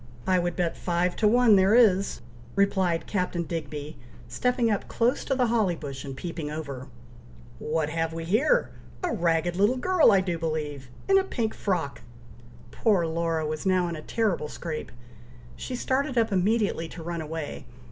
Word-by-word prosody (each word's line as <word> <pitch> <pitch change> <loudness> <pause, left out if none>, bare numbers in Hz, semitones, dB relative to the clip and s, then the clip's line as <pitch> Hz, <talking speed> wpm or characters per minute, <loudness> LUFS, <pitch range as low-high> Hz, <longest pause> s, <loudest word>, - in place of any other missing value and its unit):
I 185 -1 +3
would 175 -1 -1
bet 175 -2 -1
five 175 0 0
to 215 - +3
one 230 -1 +6
there 190 +3 +4
is!" 200 -5 +4 0.3
replied 190 -4 +1
Captain 180 -3 -1
Digby, 150 -2 -5 0.3
stepping 250 -2 +1
up, 205 - -1
close 240 +4 +1
to 270 - 0
the 255 -1 +2
holly 220 -6 +1
bush, 140 -4 -7
and 135 -2 -7
peeping 165 -3 -5
over: 140 -4 -6 0.7
"What 155 0 -1
have 165 0 -1
we 165 0 -5
here! 255 - +2 0.3
a 360 - 0
ragged 170 0 +1
little 210 +6 +3
girl, 350 -3 +4
I 195 - +5
do 175 -3 -2
believe! 150 -5 -3 0.2
in 390 0 +6
a - - 0
pink 230 - -2
frock!" - - -2 0.7
Poor 200 -7 +2
Laura 165 -1 -1
was 155 0 -3
now 185 -2 +2
in 170 - -4
a 155 - -7
terrible 200 -6 -1
scrape; 155 +1 -6 0.6
she 250 - -5
started 260 +1 -1
up 225 -1 +2
immediately 200 -3 +1
to 165 +1 -9
run 170 0 -4
away. 155 -1 -5
175 Hz, 170 wpm, -26 LUFS, 160-220 Hz, 0.7 s, one